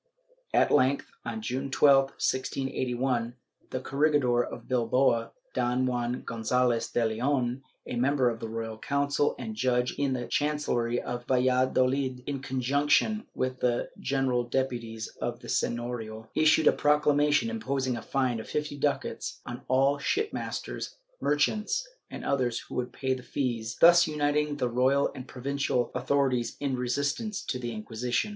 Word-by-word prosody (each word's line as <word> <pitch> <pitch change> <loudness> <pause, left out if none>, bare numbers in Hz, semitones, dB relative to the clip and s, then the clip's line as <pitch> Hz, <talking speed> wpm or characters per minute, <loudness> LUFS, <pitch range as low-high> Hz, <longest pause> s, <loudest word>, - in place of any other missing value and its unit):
At - - +3
length, 135 +2 +2
on 110 -2 -5
June 130 +4 -2
12, 135 0 +5
1681, 130 -2 -1 0.3
the 130 - -3
corregidor 135 -3 +2
of - - -8
Bilbao, 120 -1 +2 0.2
Don 125 +1 +1
Juan 125 0 -1
Gonzalez 115 +1 +1
de 120 - +1
Leon, 125 +3 0 0.2
a 120 - -4
member 130 +1 +2
of 115 -1 -1
the 115 - -5
Royal 110 -1 -5
Council 140 +2 +1
and 110 -3 -5
judge 125 +1 +1
in 140 -2 +1
the 125 -1 -2
Chancellery 125 -5 0
of 120 0 -5
Valladolid, 130 0 +2
in 140 -1 -3
conjunction 140 - +1
with 130 0 -2
the 120 -1 0
General 130 -2 +1
Deputies 120 -3 -2
of 120 0 -3
the 120 - -10
Seiiorio, 115 -3 -2
issued 155 0 +4
a - - +8
proclamation 150 +6 +3
imposing 140 - -1
a 115 - -5
fine 125 0 0
of 110 - -8
fifty 150 -1 -3
ducats 145 -1 -2
on 120 0 -6
all 135 +2 +3
shipmasters, 420 - -3 0.3
merchants 210 - +1 0.2
and - - -7
others 125 -4 +1
who - - -3
should 125 0 -8
pay 130 +1 -1
the 130 - -5
fees, 120 -4 -3
thus 170 0 +7
uniting 150 -1 0
the 125 - 0
royal 130 +4 +2
and 130 0 -8
pro 125 -2 -10
vincial 140 -3 0
authorities 125 -2 0
in 140 -2 -1
resistance 140 - -1
to 125 - -3
the 120 -1 -4
Inquisition. 115 - -2
130 Hz, 150 wpm, -28 LUFS, 120-140 Hz, 0.3 s, a